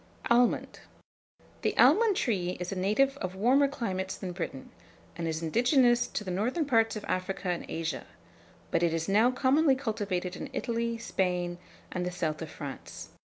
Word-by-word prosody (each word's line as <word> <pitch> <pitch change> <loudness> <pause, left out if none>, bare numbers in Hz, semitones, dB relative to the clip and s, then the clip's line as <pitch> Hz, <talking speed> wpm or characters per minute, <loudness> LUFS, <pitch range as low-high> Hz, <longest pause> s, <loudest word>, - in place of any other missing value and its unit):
ALMOND. 240 0 +2 0.8
The - - -1
almond 440 -2 +6
tree 185 -7 0
is 180 +1 -4
a - - -3
native 215 +9 +2
of 185 -6 -4
warmer 255 +8 +4
climates 190 -9 -3
than 185 - -5
Britain, 170 -7 -6 0.4
and 165 0 -3
is 160 0 -3
indigenous 240 - +3
to - - -4
the 185 - -4
northern 245 - 0
parts 225 -5 +2
of 215 - -6
Africa 185 0 -2
and 175 - -2
Asia; 160 -6 -3 0.6
but 170 - +2
it 170 -1 +2
is 165 0 -2
now 215 +5 +4
commonly 270 +3 +3
cultivated 205 -8 -2
in 285 - -6
Italy, 235 -2 -1
Spain, 180 -5 -1 0.3
and 180 - -2
the 180 - -1
south 170 -4 -3
of 160 - -5
France. 140 -3 -8
195 Hz, 165 wpm, -29 LUFS, 180-245 Hz, 0.8 s, almond